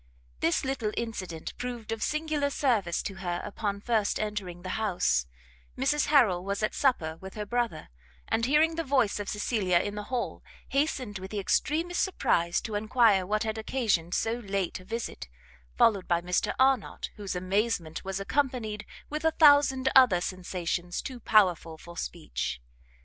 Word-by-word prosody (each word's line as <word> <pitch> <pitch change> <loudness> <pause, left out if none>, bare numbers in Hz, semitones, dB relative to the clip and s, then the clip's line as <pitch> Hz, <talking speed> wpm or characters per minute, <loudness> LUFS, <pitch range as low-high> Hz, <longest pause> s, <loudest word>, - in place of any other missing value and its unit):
This 170 - +1
little 265 -5 -1
incident 185 -8 -4
proved 240 -3 -5
of 225 -1 -3
singular 305 0 0
service 225 - +1
to 195 - -5
her 175 -2 -2
upon 205 -1 -3
first 220 -2 +1
entering 200 -5 -4
the 185 - -5
house; 120 - +1 0.5
Mrs 285 +3 +1
Harrel 220 -12 +4
was 200 +2 -2
at 215 - 0
supper 165 - +1
with 190 +2 -10
her 210 -1 -4
brother, 235 -7 -2 0.4
and 230 +1 +1
hearing 305 +4 +4
the 330 0 -2
voice 260 -8 +1
of 205 - -4
Cecilia 205 -4 +1
in 205 +4 -1
the 210 0 -5
hall, 250 +1 -3 0.3
hastened 265 -7 -1
with 190 +1 -7
the 210 - -5
extremest 320 - 0
surprise 170 - +1
to 220 - -6
enquire 210 -3 +3
what 215 +2 +1
had 220 0 -3
occasioned 215 -8 0
so 230 +2 0
late 195 -5 -2
a 185 - -14
visit; 225 - -5 0.5
followed 200 -5 +4
by 170 -1 +2
Mr 180 +1 -1
Arnott, 260 -4 +1
whose 200 -3 -4
amazement 185 -3 -1
was 195 0 -3
accompanied 230 -2 -1 0.2
with 305 +1 -4
a 320 - +5
thousand 285 -4 +5
other 250 -9 +7
sensations 180 -1 -3
too 255 -3 -6
powerful 180 -8 +3
for 170 +2 -12
speech. 170 - -4
210 Hz, 160 wpm, -28 LUFS, 185-255 Hz, 0.5 s, other